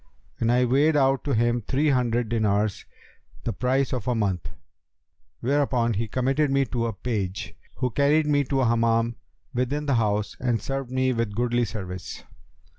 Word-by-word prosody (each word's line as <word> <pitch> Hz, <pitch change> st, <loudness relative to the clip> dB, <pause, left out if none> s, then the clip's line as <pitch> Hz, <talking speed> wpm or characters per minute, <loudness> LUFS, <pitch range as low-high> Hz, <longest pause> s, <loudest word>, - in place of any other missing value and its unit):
And 115 Hz, 0 st, +2 dB
I 125 Hz, +1 st, +3 dB
weighed 145 Hz, +5 st, +3 dB
out 135 Hz, -1 st, +3 dB
to 140 Hz, -4 st, +1 dB
him 120 Hz, +1 st, +2 dB
three 140 Hz, +7 st, +1 dB
hundred 120 Hz, -2 st, +1 dB
dinars, 105 Hz, -3 st, 0 dB, 0.6 s
the 115 Hz, -, -2 dB
price 130 Hz, +2 st, 0 dB
of 125 Hz, -4 st, -3 dB
a 125 Hz, -, +1 dB
month; 100 Hz, -6 st, -1 dB, 0.9 s
whereupon 130 Hz, -3 st, +1 dB
he 110 Hz, +3 st, -2 dB
committed 135 Hz, +6 st, +1 dB
me 135 Hz, 0 st, +2 dB
to 115 Hz, -1 st, 0 dB
a 115 Hz, -, -3 dB
page, 100 Hz, -3 st, -3 dB, 0.2 s
who 125 Hz, -2 st, -1 dB
carried 145 Hz, +4 st, +3 dB
me 145 Hz, -1 st, +2 dB
to 135 Hz, +1 st, 0 dB
a -, -, +2 dB
Hammam 115 Hz, 0 st, +2 dB, 0.4 s
within 130 Hz, +5 st, -1 dB
the 140 Hz, -, +1 dB
house 105 Hz, -3 st, 0 dB
and 120 Hz, -3 st, 0 dB
served 135 Hz, -2 st, -4 dB
me 130 Hz, 0 st, +1 dB
with 115 Hz, -3 st, -2 dB
goodly 120 Hz, +1 st, +1 dB
service. 95 Hz, -4 st, -6 dB
120 Hz, 170 wpm, -25 LUFS, 115-135 Hz, 0.9 s, I